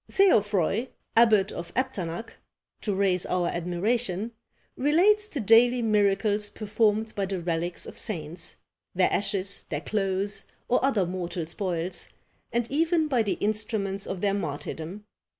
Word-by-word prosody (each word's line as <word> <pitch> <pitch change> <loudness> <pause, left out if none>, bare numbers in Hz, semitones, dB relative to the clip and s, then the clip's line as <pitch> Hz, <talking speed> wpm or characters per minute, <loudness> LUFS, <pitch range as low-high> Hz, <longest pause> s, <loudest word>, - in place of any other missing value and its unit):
Theofroy, 210 - +3 0.3
abbot 215 -4 +5
of 170 - -7
Epternac, 225 -7 -2 0.5
to 205 -3 -1
raise 190 -2 +2
our 180 -1 +1
admiration, 190 +4 -1 0.4
relates 380 +10 +4
the 310 -9 -5
daily 240 +2 +5
miracles 210 -1 +2
performed 215 0 0
by 195 -1 -1
the 190 -1 -3
relics 170 0 -2
of - - -7
saints, 170 -4 -3 0.4
their 185 0 +3
ashes, 195 -1 -1
their 145 -1 -2
clothes, 195 +2 -1 0.2
or 250 - +2
other 235 -9 +2
mortal 175 -1 -3
spoils, 175 0 -3 0.4
and 235 0 +1
even 320 +2 +2
by 255 -5 +2
the 205 -3 0
instruments 205 -2 -1
of 185 -2 -4
their 200 -1 +2
martyrdom. 165 +2 -5
200 Hz, 130 wpm, -27 LUFS, 180-225 Hz, 0.5 s, abbot